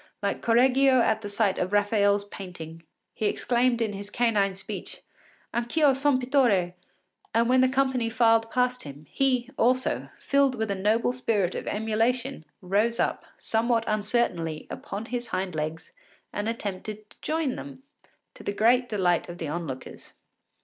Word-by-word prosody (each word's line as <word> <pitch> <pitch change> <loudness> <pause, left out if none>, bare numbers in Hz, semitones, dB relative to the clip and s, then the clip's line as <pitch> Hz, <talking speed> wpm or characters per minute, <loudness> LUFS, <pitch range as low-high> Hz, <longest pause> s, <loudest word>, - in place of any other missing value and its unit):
Like 200 - -1
Correggio 255 +3 +4
at 220 -2 +2
the 205 - -6
sight 205 -1 +1
of 180 - -1
Raphael’s 205 -1 +2
painting, 175 -5 -9 0.3
he 215 - -1
exclaimed 240 +2 +1
in 215 -2 -2
his 200 +1 -7
canine 210 -5 +1
speech, 190 - -7 0.5
Anch’ 235 +5 -3
io 295 -3 +6
son 270 0 +2
pittore! 245 -9 +2 0.6
and 230 +1 +4
when 255 +1 +4
the 260 - +4
company 260 -3 +1
filed 225 -1 +3
past 250 +1 0
him, 145 +1 -9
he 260 -2 +1
also, 255 +2 +1
filled 275 -2 +2
with 220 -3 -2
a - - +2
noble 215 +5 +1
spirit 215 -7 0
of - - -5
emulation, 225 - -1 0.2
rose 210 +5 +1
up, - - 0
somewhat 230 0 +1
uncertainly, 205 -7 -1
upon 210 +3 -6
his 245 0 -4
hind 185 -1 -2
legs 155 +1 -4 0.4
and 205 +2 -2
attempted 215 -1 -5
to - - -20
join 310 -4 -1
them, 270 -2 -9 0.5
to - - -13
the 200 - -2
great 245 +4 +3
delight 180 -5 +1
of 175 - -7
the 165 - -4
onlookers. 150 -5 -6
225 Hz, 155 wpm, -26 LUFS, 200-250 Hz, 0.6 s, io